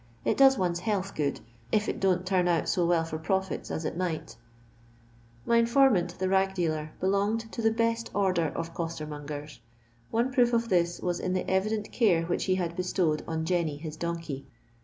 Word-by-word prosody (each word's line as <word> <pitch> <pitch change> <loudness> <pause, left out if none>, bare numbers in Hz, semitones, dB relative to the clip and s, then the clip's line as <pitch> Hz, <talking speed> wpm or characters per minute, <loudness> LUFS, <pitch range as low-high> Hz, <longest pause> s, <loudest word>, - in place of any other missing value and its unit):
It - - +2
does 270 -1 +6
one's 175 -2 0
health 195 0 -2
good, 145 -2 -1 0.3
if 210 -1 +2
it - - -2
don't 185 -1 +1
turn 185 -1 +2
out 170 -2 +1
so 175 -3 +2
well 170 -1 +3
for 160 -1 -5
profits 190 +3 -2
as 160 - -3
it - - -2
might" 175 -3 -3 1.1
My 235 - +3
informant, 230 -7 +3
the 185 - -1
rag 190 0 +2
dealer, 155 -3 -1
belonged 205 +4 0
to - - -4
the 225 - +4
best 230 +1 0
order 185 -5 +2
of 165 0 -4
costcrmongers; 150 -3 -6 0.5
one 235 +3 +1
proof 245 -2 +3
of 230 0 +1
this 175 -2 +1
was 175 -1 -1
in 185 - -1
the 185 - -1
evident 210 +3 0
care 180 -9 +3
which 175 +1 -1
he 185 - +2
had 170 -2 -2
bestowed 180 -4 0
on 160 0 -2
Jenny, 165 -4 0
his 155 0 -7
donkey. 165 -4 -4
180 Hz, 185 wpm, -28 LUFS, 165-210 Hz, 1.1 s, does